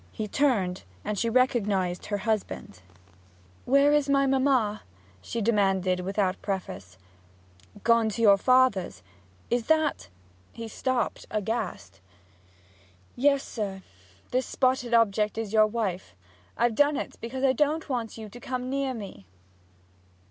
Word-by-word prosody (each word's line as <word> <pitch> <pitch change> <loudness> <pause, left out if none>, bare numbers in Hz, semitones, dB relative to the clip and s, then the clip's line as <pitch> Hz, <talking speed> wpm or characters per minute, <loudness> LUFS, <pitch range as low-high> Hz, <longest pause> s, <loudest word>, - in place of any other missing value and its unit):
He 215 - -4
turned, 205 -8 +1 0.2
and 210 - -2
she 230 - +1
recognized 210 -8 +1
her 205 - -1
husband. 210 - -3 0.8
'Where's 280 +2 +4
my 275 0 +3
mamma?' 260 -6 +2 0.4
she 230 - -4
demanded 195 -4 +2
without 190 0 -1
preface. 95 - -5 0.9
'Gone 230 -1 +4
to 225 +2 -4
your 200 -2 +7
father's. 255 - +2 0.5
Is 240 -1 0
that 310 - +1 0.2
' 90 +1 -32
He 230 - -5
stopped, 255 +2 -2
aghast. 215 - -4 1.1
'Yes, 280 +2 +3
sir. 195 -4 -5 0.5
This 255 +1 0
spotted 255 -2 +1
object 215 -2 +2
is 225 -2 -4
your 215 -1 +5
wife! 195 - -3 0.4
I've 240 -1 +2
done 290 +4 +3
it - - -5
because 260 +3 -5
I 265 -1 +4
don't 300 +4 0
want 240 -6 -3
you 220 -1 -7
to 240 +4 -12
come 255 0 -4
near 275 -1 -1
me!' 195 - -9
225 Hz, 130 wpm, -27 LUFS, 195-260 Hz, 1.1 s, your